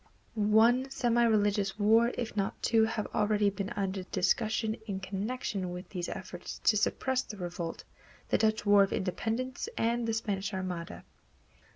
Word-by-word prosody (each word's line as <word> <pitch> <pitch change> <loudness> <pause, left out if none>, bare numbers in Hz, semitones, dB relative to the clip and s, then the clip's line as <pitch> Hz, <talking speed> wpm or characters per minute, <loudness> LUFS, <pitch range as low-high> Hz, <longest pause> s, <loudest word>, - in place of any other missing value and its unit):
One 225 +4 +4
semi 240 -3 +2
religious 205 -3 +2
war, 225 +3 +4
if 235 -3 -4
not 200 -2 -2
two, 225 -1 +4
have 220 -1 -2
already 210 -1 +2
been 200 0 -4
under 195 -1 -2
discussion 215 +4 0
in 195 -2 -3
connection 195 0 -3
with 180 +1 -7
these 180 -3 -4
efforts 180 -1 -7
to 215 - +4
suppress 260 +5 +1
the 210 - -9
revolt, 175 -2 -5 0.5
the - - +2
Dutch 220 -1 +1
War 205 0 +6
of 195 - +2
Independence 230 - -2
and 235 +1 0
the 225 - 0
Spanish 205 -2 -2
Armada. 180 -3 -5
210 Hz, 155 wpm, -30 LUFS, 190-225 Hz, 0.5 s, War